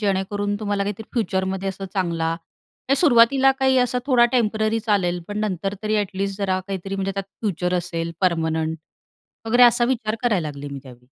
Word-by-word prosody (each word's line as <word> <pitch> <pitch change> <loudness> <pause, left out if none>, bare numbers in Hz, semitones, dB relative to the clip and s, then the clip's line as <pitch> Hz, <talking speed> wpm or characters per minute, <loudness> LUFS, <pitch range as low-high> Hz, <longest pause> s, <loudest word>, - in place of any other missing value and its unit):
जेणेकरून 205 0 -1
तुम्हाला 205 -1 -1
काहीतरी 210 +2 -4
फ्युचरमध्ये 190 -3 -1
असं 195 +1 -8
चांगला 170 -4 0 0.6
हे 275 - +5
सुरुवातीला 270 -1 +5
काही 265 -1 +4
असा 250 0 +1
थोडा 245 -3 +5
टेम्पररी 220 -2 +1
चालेल, 180 -4 +1
पण 205 0 -4
नंतर 195 0 -2
तरी 215 0 0
ॲटलीस्ट 195 0 -2
जरा 190 -2 0
काहीतरी, 195 0 -4
म्हणजे 195 0 -2
त्यात 195 -1 -4 0.2
फ्युचर 180 -4 -1
असेल, 170 -1 -4
पर्मनंट 160 -2 0 0.7
वगैरे, 245 +2 +4
असा 240 0 +6
विचार 230 -4 -1
करायला 200 -11 +1
लागले 145 0 -8
मी - - -5
त्यावेळी. 125 -2 -15
200 Hz, 165 wpm, -22 LUFS, 180-220 Hz, 0.7 s, असा